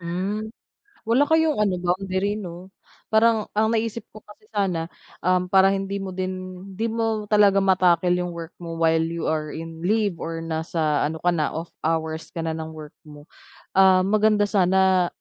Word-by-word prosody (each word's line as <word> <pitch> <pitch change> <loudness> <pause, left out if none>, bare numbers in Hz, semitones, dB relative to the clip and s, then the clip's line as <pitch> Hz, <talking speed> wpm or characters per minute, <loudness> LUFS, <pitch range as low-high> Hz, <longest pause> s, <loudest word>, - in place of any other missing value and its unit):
Hmm, 190 +5 -3 0.6
wala 250 +6 +3
kayong 320 -6 +2
ano 200 -3 +2
boundary 190 +3 -1
'no? 180 0 -9 0.4
Parang 220 0 +4
ang 215 +1 +2
naisip 225 0 -1 0.2
ko 215 - -12
kasi 210 +1 -18
sana, 185 -6 -1 0.3
um, 185 0 +2
para 190 +1 +5
hindi 195 0 -2
mo 195 - -5
din 185 0 -5
'di 225 +4 -2
mo 225 -2 -2
talaga 200 -2 +5
ma-tackle 180 -2 +3
'yung 180 -1 -3
work 170 -1 -8
mo 165 -1 -7
while 160 0 +3
you 165 0 -3
are 155 -1 -2
in 165 +1 -8
leave 205 -2 +1
or 165 0 -5
nasa 160 -2 -1
ano 160 +2 -3
ka 175 - 0
na, 155 - 0
off 165 +2 -5 0.2
hours 160 0 -2
ka 170 - -5
na 160 0 -2
ng 160 0 -6
work 155 -1 -11
mo, 150 0 -14 0.4
ah, 190 -1 +5
maganda 210 +1 +3
sana, 190 -2 +3
185 Hz, 175 wpm, -23 LUFS, 165-205 Hz, 0.6 s, para